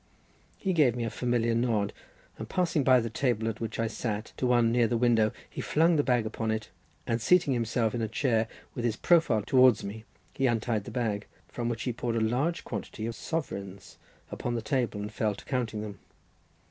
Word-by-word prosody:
He 190 -2 -1
gave 145 -8 +4
me 120 - -2
a 115 - -2
familiar 120 -2 0
nod, 115 -4 +1 0.5
and - - -6
passing 175 -5 +1
by 130 -1 +6
the 115 - -3
table, 115 -3 0
at 115 0 -3
which 115 -1 -3
I 115 - +2
sat, 110 -1 -3
to 130 - 0
one 120 -2 +4
near 120 -1 +3
the 120 - 0
window, 115 -2 +3 0.2
he - - -6
flung 165 +2 +3
the 150 - +4
bag 125 -5 +1
upon 110 0 -3
it, 110 -1 -2 0.3
and 115 0 -1
seating 170 +1 +4
himself 115 -1 0
in 120 - -2
the 110 - 0
chair 115 0 +1 0.3
with 120 - -4
his 115 -3 +1
profile 160 - +3
towards 130 -1 +5
me, 110 +2 -7 0.3
he 135 - +1
untied 115 -3 0
the - - -6
bag, 110 -5 -2 0.2
from 120 -1 -3
which 120 +1 -3
he 125 - -1
poured 120 0 -2
a - - +2
large 130 +10 0
quantity 110 - -5
of 115 - -3
sovereigns 100 - -5 0.3
upon 120 - -3
the 115 - -1
table, 120 -3 -1
and 105 +1 -5
fell 105 -2 0
to - - -13
counting 120 -5 -2
them. 105 -2 -8
115 Hz, 210 wpm, -29 LUFS, 110-125 Hz, 0.5 s, by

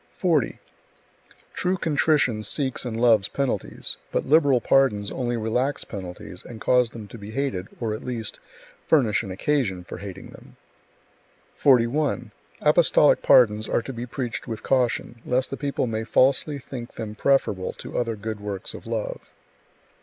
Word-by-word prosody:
40. 160 - +1 1.0
True 185 +1 0
contrition 150 -8 +2
seeks 130 +5 -1
and 115 -2 -3
loves 115 -4 +4
penalties, 140 -2 -2
but - - -1
liberal 145 -3 +4
pardons 110 -6 +2
only 120 -2 -2
relax 125 +6 -1
penalties 90 -4 -8
and 115 - -10
cause 125 +1 +3
them 110 -3 -9
to 115 - -10
be 100 +1 -9
hated, 115 -6 -2
or 115 -3 -1
at 110 - -6
least, 115 -4 -4 0.5
furnish 125 -10 +3
an 105 - -7
occasion 95 -2 -1
[for 90 - -8
hating 95 -1 -9
them]. - - -15 1.0
41. 125 -2 +2 0.3
Apostolic 150 -1 +5
pardons 110 -3 +5
are 115 - +1
to 135 - -6
be 120 +1 -5
preached 120 -2 -4
with 110 - -5
caution, 120 -2 0
lest 125 +1 0
the - - -2
people 140 -2 -1
may 110 -2 -2
falsely 135 +5 +2
think 130 -3 -8
them 110 -2 -5
preferable 105 -6 +1
to - - -9
other 115 -2 0
good 110 0 -5
works 100 -2 -5
of - - -10
love. 115 -2 -4
120 Hz, 155 wpm, -24 LUFS, 110-135 Hz, 1.0 s, Apostolic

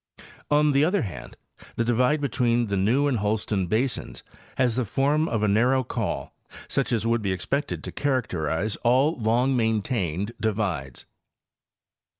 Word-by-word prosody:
On 150 0 +4
the 140 +1 +3
other 180 +3 +2
hand, 95 - -8 0.4
the 115 - 0
divide 125 +5 +2
between 120 -4 +1
the 100 -2 -2
New 115 +9 +2
and 135 -6 +1
Holston 105 -2 -1
basins 120 +7 -2 0.3
has 125 -4 +2
the 130 - +1
form 145 +7 +1
of 110 -2 -1
a - - +3
narrow 125 +6 +3
col, - - -3 0.3
such - - -1
as 115 -2 0
would 115 0 +1
be 100 -2 -1
expected 140 - -2
to - - -5
characterize 100 - -1
all 130 +6 +2
long 120 +4 +2
maintained 110 - -1
divides. 95 - -2
115 Hz, 150 wpm, -25 LUFS, 105-135 Hz, 0.4 s, On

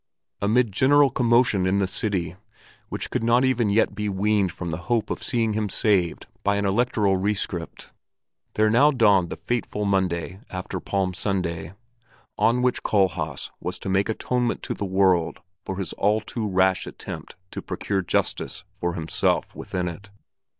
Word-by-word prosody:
Amid 110 +2 +2
general 140 +6 +4
commotion 120 -6 +3
in 95 +2 +2
the 100 - +2
city, 95 -3 -2 0.5
which - - -4
could - - -1
not 120 +3 +4
even 125 -4 +2
yet 105 +3 +2
be 105 0 -2
weaned 100 -1 +1
from 85 0 -5
the 80 - -2
hope 115 -3 +1
of - - -3
seeing 115 -3 0
him 105 -1 -1
saved 95 -6 +1 0.2
by 100 0 +1
an 100 0 0
electoral 100 -2 +2
rescript, 95 -3 -3 0.6
there 110 0 +3
now 140 +6 +6
dawned 105 - +4
the - - -4
fateful 110 -3 -2
Monday 95 -2 0
after 95 0 -5
Palm 95 0 -1
Sunday, 90 -4 -2 0.6
on 125 +2 +2
which 125 -1 +1
Kohlhaas 85 -8 0
was - - -4
to - - -6
make 100 +3 +1
atonement 125 +2 -1
to - - -3
the 100 - -4
world 95 -3 +2 0.2
for 95 - -4
the 95 -3 -4
all 105 +2 +3
too 110 0 -4
rash 95 -1 +2
attempt - - -8 0.2
to - - -5
procure 100 -1 -2
justice 90 - -1
for 85 -3 -3
himself 80 -1 0
within 90 -1 -3
it. 90 +5 -8
100 Hz, 165 wpm, -24 LUFS, 95-110 Hz, 0.6 s, now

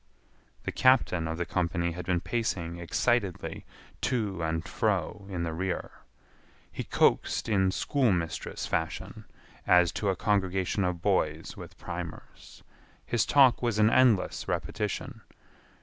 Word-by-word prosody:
The - - -3
captain 120 -10 +3
of 80 0 -3
the 85 - -1
company 85 -1 -1
had 85 +1 -7
been 90 -2 +1
pacing 90 -7 -2
excitedly 100 +2 -1 0.4
to 105 -8 -1
and 80 +1 -2
fro 100 0 -1
in 90 -3 -3
the 80 -1 -2
rear. 90 +2 -3 0.8
He - - -4
coaxed - - +2
in 95 -4 +3
schoolmistress 95 - -1
fashion, 80 -1 -3 0.4
as 90 -2 +5
to 100 - -1
a 95 - +1
congregation 95 -1 0
of 90 -2 -2
boys - - 0
with - - -11
primers. - - -8 0.4
His 120 -3 +1
talk 135 -4 +5
was 120 -4 0
an 110 +1 +5
endless 120 -7 +3
repetition. - - -3
95 Hz, 130 wpm, -29 LUFS, 85-110 Hz, 0.8 s, as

